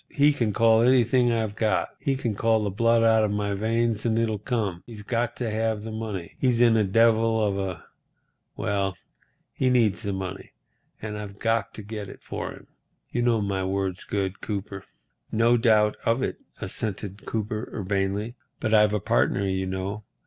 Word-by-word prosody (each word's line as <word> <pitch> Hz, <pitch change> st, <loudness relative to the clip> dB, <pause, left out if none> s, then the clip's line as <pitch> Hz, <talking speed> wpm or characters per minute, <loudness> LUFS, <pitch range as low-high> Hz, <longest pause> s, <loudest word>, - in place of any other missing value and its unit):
He 145 Hz, +1 st, +4 dB
can 115 Hz, -7 st, 0 dB
call 115 Hz, +1 st, +4 dB
anything 125 Hz, 0 st, +4 dB
I've 110 Hz, -3 st, -1 dB
got. 110 Hz, -1 st, +1 dB
He 135 Hz, -, 0 dB
can 120 Hz, -4 st, -2 dB
call 110 Hz, +1 st, +2 dB
the 100 Hz, -, -1 dB
blood 115 Hz, +3 st, +3 dB
out 110 Hz, -1 st, +5 dB
of 105 Hz, -, +1 dB
my 100 Hz, 0 st, -1 dB
veins 115 Hz, +1 st, 0 dB
and 115 Hz, -1 st, +1 dB
it'll 110 Hz, -2 st, 0 dB
come. 105 Hz, -6 st, -2 dB
He's 110 Hz, -3 st, -9 dB
got 120 Hz, +2 st, -1 dB
to 120 Hz, -3 st, -3 dB
have 110 Hz, -1 st, -1 dB
the 110 Hz, -, -6 dB
money. 110 Hz, -6 st, -5 dB
He's 125 Hz, -3 st, +2 dB
in 120 Hz, -2 st, +5 dB
a 110 Hz, -, +4 dB
devil 115 Hz, +2 st, +3 dB
of 100 Hz, -2 st, 0 dB
a—Well, 95 Hz, +1 st, -5 dB, 0.6 s
he 130 Hz, -, +1 dB
needs 115 Hz, -7 st, +2 dB
the 100 Hz, -2 st, -2 dB
money, 95 Hz, 0 st, -6 dB, 0.5 s
and 105 Hz, -1 st, -4 dB
I've 100 Hz, -1 st, -8 dB
got 115 Hz, +1 st, 0 dB
to 110 Hz, -, -8 dB
get 105 Hz, -1 st, -6 dB
it -, -, -12 dB
for -, -, -5 dB
him. -, -, -13 dB, 0.5 s
You 120 Hz, -, 0 dB
know 120 Hz, -2 st, +2 dB
my 100 Hz, -1 st, -1 dB
word's 95 Hz, -1 st, -2 dB
good, 100 Hz, -1 st, -3 dB
Cooper." 100 Hz, -2 st, -5 dB, 0.5 s
"No 115 Hz, +2 st, +4 dB
doubt 110 Hz, -3 st, +3 dB
of 115 Hz, +3 st, +1 dB
it," -, -, -3 dB, 0.2 s
assented 100 Hz, -1 st, -4 dB
Cooper, 110 Hz, +1 st, -3 dB
urbanely, 100 Hz, +2 st, -2 dB, 0.3 s
"but 110 Hz, -1 st, -1 dB
I've 105 Hz, -1 st, +5 dB
a 105 Hz, -, +1 dB
partner, 70 Hz, +6 st, +1 dB
you 95 Hz, 0 st, -1 dB
know. 95 Hz, +3 st, -3 dB
110 Hz, 180 wpm, -25 LUFS, 100-115 Hz, 0.6 s, out